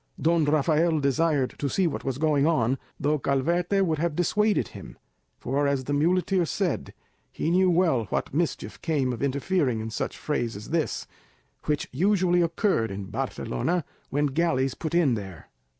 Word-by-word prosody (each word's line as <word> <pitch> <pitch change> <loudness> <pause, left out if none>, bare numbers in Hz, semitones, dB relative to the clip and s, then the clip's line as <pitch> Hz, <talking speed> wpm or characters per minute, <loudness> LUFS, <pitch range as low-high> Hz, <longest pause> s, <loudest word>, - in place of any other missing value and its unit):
Don 165 -1 +3
Rafael 155 +2 +2
desired 140 -1 +1
to 140 - -1
see 190 +7 +1
what 165 - -2
was 135 -2 -2
going 150 -1 +2
on, 130 -5 +1 0.2
though 150 +1 +1
Calvete 175 +9 +1
would 160 -3 -1
have 165 -1 0
dissuaded 210 +5 +1
him; - - -11 0.4
for, 140 +3 0
as 140 -2 0
the 145 - -3
muleteer 180 +5 +2
said, 160 - -2 0.4
he 165 - -2
knew 185 +1 +4
well 165 -10 +2
what 95 - -3
mischief 165 +2 -2
came 140 -6 0
of 115 - -7
interfering 140 -2 0
in 110 +1 -5
such - - -3
frays 120 -7 -2
as 105 +7 -9
this, 165 -2 -1 0.6
which 150 -1 -1
usually 180 +3 +2
occurred 170 - +1
in 95 0 -6
Barcelona 170 - -2 0.2
when 145 +2 +1
galleys 135 -3 +1
put 165 +1 -4
in 160 -7 +4
there. 95 -8 -7
150 Hz, 165 wpm, -26 LUFS, 135-170 Hz, 0.6 s, knew